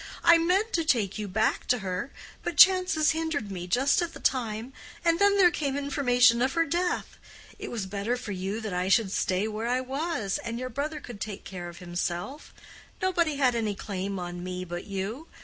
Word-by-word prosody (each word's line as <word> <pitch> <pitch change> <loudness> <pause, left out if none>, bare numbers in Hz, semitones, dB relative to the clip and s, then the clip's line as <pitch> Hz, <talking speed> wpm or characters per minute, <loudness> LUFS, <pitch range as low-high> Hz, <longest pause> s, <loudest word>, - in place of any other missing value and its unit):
"I 335 0 +7
meant 380 +7 +1
to 335 - +2
take 215 -10 +1
you 210 - -3
back 215 +3 0
to 250 - +3
her, 190 +5 -4 0.3
but 345 -3 -4
chances 365 -4 +6
hindered 315 -9 -2
me 180 -2 -5
just 265 - +3
at 340 -1 -3
the - - -10
time, 235 -1 -1 0.3
and 335 0 +3
then 405 0 +4
there 360 -3 +6
came 280 -4 -2
information 250 -4 +3
of 260 +1 +1
her 330 0 +2
death. 345 +3 -2 0.4
It - - -6
was 220 -5 -3
better 205 +5 -2
for 235 -4 -6
you 195 +3 -3
that 215 -4 -4
I 180 +1 -1
should 200 -1 +3
stay 190 +1 0
where 220 +1 -3
I 250 +1 +1
was, 265 - -2
and 230 0 -5
your 255 +1 -4
brother 295 +5 -3
could 240 -8 -10
take 210 -2 -5
care 175 -2 -7
of 170 - -12
himself. 175 - -4 0.5
Nobody 340 -5 +1
had 265 -3 +3
any 220 -3 -1
claim 195 0 -4
on 175 -1 -5
me 185 0 -4
but 175 0 -6
you. 205 +10 -4
240 Hz, 200 wpm, -27 LUFS, 195-310 Hz, 0.5 s, I